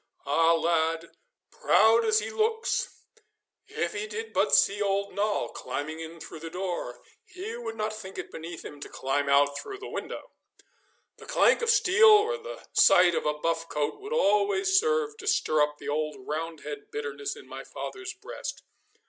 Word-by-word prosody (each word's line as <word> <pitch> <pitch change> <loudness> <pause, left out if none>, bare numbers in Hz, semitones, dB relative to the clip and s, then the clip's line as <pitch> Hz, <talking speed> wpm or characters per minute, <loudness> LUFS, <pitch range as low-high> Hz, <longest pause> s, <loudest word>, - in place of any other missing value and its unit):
Ah, 165 +4 +4
lad, 165 0 0 0.4
proud 225 +1 +4
as 215 -1 +3
he 220 +1 -1
looks, 445 - -1 0.6
if 445 +2 -3
he 210 +1 -4
did 220 +1 -6
but 145 - +3
see 200 +9 +3
old 200 0 0
Noll 205 +1 0
coming 155 +2 -5
in 165 +1 -8
through 160 - -9
the 165 +1 -7
door 175 -9 -4 0.2
he 370 +4 -7
would 230 -1 -6
not 215 0 -2
think 195 -3 -9
it - - -6
beneath 165 +1 -8
him 145 - -9
to - - -8
climb 140 +1 -1
out 140 0 +3
through 400 - -7
the 405 - -8
window!' - - -6 0.9
The - - -13
clank - - +4
of 470 - 0
steel 445 0 +6
or 430 +3 +5
the - - -9
sight 180 -1 +6
of - - -1
a 150 - +1
buff 165 +1 -2
coat 150 - -2
would 415 +2 -8
always 375 - +3
serve 455 -1 0
to 425 - -9
stir 155 - +2
up 150 0 +1
the - - -7
old 150 +1 -1
Roundhead 150 -2 -5
bitterness 145 -1 -4
in - - -13
my 135 +1 -8
father's 375 - -7
breast. - - -7
190 Hz, 175 wpm, -27 LUFS, -, 0.9 s, steel